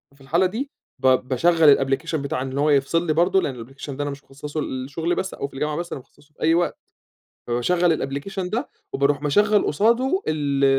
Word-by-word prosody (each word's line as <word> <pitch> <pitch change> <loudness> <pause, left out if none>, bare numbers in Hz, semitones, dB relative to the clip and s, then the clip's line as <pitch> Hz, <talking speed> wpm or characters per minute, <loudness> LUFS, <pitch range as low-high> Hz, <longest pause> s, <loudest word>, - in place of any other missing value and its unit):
في 140 - -23
الحالة 170 +7 +2
دي 245 +10 -3 0.3
ب 130 - +2
باشغّل 140 +4 +4
الapplication 135 +5 -1
بتاع 140 -3 -2
إن 135 +1 -4
هو 150 +2 +2
يفصل 150 +4 +2
لي 155 - +2
برضه، 180 +4 +3
لأن 125 -8 -4
الapplication 135 +2 -9
ده 145 +2 -3
أنا 145 - -2
مش 140 +1 -9
مخصّصُه 145 +3 -6
للشغل 145 +7 -2
بس، 190 - -3
أو - - -4
في 140 - -20
الجامعة 150 +2 -2
بس، 170 +2 -4
أنا - - -5
مخصّصُه - - -26
في - - -24
أي 160 +1 +4
وقت، 175 +1 +1 0.7
فباشغّل 140 +2 +1
الapplication 190 -1 -4
ده، 240 +8 -2 0.2
وباروح 140 0 +1
مشغّل 205 +8 +3
قصادُه 235 - +2
ال 140 -3 +1
150 Hz, 200 wpm, -23 LUFS, 135-175 Hz, 0.7 s, باشغّل